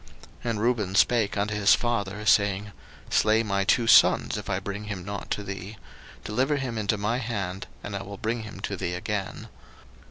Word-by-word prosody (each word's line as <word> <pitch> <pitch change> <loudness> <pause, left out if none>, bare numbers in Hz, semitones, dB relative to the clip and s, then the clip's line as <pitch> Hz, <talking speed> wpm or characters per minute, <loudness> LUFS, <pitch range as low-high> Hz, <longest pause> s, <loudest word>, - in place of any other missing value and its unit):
01:042:037 120 - -2
And 110 -2 -1
Reuben 110 -5 0
spake 110 0 +3
unto 105 +1 0
his 105 0 +5
father, 105 -3 -2
saying, 100 -1 +3 0.4
Slay 110 +1 +3
my 100 -2 0
two 115 +4 +3
sons, - - +5
if - - -6
I - - 0
bring 100 +1 -6
him 100 -4 -5
not 100 0 -6
to 105 - -2
thee: 100 +2 -7 0.5
deliver 130 +7 0
him 125 -5 -3
into 105 0 0
my 105 +5 -1
hand, 100 -6 -4 0.2
and 100 - -5
I 100 - -3
will 100 0 -8
bring 115 +3 -2
him 110 -2 -9
to - - -3
thee 90 - -3
again. 100 +1 -4
105 Hz, 190 wpm, -26 LUFS, 100-115 Hz, 0.5 s, his